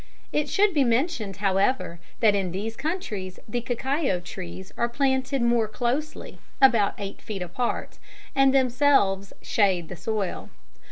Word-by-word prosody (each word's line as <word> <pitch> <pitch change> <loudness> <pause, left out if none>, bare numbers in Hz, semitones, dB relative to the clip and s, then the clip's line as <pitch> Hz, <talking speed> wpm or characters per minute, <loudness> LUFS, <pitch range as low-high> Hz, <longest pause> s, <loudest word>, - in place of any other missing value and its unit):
It 300 -1 0
should 410 -1 +3
be 290 -4 +4
mentioned, 235 - 0
however, 195 -1 +1 0.2
that 215 -3 +5
in 195 -3 0
these 210 +5 -4
countries 225 - -4
the 240 +3 -2
cacao 255 - -1
trees 95 - -8
are 235 - 0
planted 265 +1 0
more 235 -2 +3
closely 250 +7 -3 0.2
(about 235 -7 +5
eight 200 -1 -6
feet 205 -5 -4
apart) 180 +8 -3 0.3
and 270 0 +5
themselves 250 -7 +3
shade 185 -6 +1
the - - -6
soil. 210 0 -3
230 Hz, 135 wpm, -25 LUFS, 195-270 Hz, 0.3 s, that